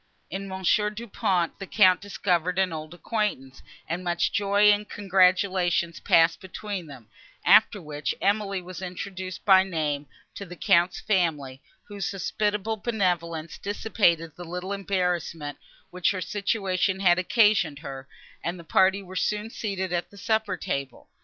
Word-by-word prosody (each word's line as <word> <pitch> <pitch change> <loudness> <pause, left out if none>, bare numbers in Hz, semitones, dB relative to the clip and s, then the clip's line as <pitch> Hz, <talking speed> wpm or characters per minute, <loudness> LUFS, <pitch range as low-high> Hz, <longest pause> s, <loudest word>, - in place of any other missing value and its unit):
In 195 +1 -4
Monsieur 190 +2 +1
Du 220 +3 -8
Pont 185 -6 0
the 195 - -6
Count 185 -4 +5
discovered 180 -3 -1
an 190 -3 +1
old 155 0 -6
acquaintance, 175 - -3 0.3
and 170 +3 -3
much 175 -1 0
joy 205 +1 +4
and 210 0 0
congratulation 185 -3 +2
passed 165 0 +4
between 190 -1 -6
them, 130 -6 -12 0.4
after 205 - +6
which 150 -3 -4
Emily 200 -2 0
was 185 +1 -8
introduced 185 0 -6
by 190 -2 +7
name 155 -6 -2 0.3
to - - -7
the 180 -2 -9
Count's 175 +1 +2
family, 150 -9 -1 0.2
whose 200 -3 -5
hospitable 210 +2 -1
benevolence 175 -7 -2
dissipated 185 -6 +1
the 175 - -8
little 180 +3 -5
embarrassment, 180 -6 -2 0.3
which 180 -1 +1
her 185 -2 -2
situation 190 0 -1
had 175 -2 +4
occasioned 195 -6 +3
her, 135 -2 -8 0.4
and 175 +2 -3
the - - -10
party 190 +4 +3
were 185 0 -11
soon 210 +3 -1
seated 190 -5 -3
at 175 -1 -2
the 200 - -16
supper 215 -2 0
table. 140 -6 -5
185 Hz, 145 wpm, -26 LUFS, 170-200 Hz, 0.4 s, by